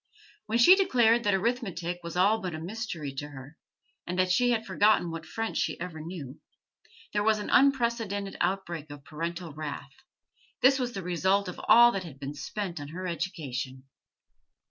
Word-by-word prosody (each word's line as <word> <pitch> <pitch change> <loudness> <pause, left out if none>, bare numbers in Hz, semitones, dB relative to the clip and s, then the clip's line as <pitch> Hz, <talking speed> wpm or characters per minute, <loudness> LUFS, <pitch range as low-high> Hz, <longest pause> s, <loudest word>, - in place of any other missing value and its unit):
When 220 +2 +1
she 240 +11 +8
declared 240 - +3
that 205 - +3
arithmetic 190 -6 -2
was 170 +1 -6
all 205 +4 +3
but 180 -4 -4
a - - -5
mystery 170 - -5
to 145 - -4
her, 135 +1 -11 0.5
and 180 - -3
that 185 0 +2
she 245 +7 +3
had 225 -2 0
forgotten 195 -2 +3
what 165 0 -7
French 225 0 -3
she - - -1
ever 170 -3 -6
knew, 155 -5 -8 0.7
there 205 - +1
was 215 +1 +3
an 210 - -5
unprecedented 235 -7 +2
outbreak 175 -4 -2
of 145 -1 -10
parental 170 +1 -5
wrath: 145 -2 -6 0.7
this 270 +1 +6
was 245 -1 -2
the 195 - -5
result 190 +3 +1
of 180 - -7
all 240 +1 +8
that 195 -4 -3
had 145 -6 -11
been 140 +1 -5
spent 175 +4 -5
on 145 - -7
her 180 +5 -6
education! 145 -7 -4
180 Hz, 175 wpm, -28 LUFS, 155-220 Hz, 0.7 s, she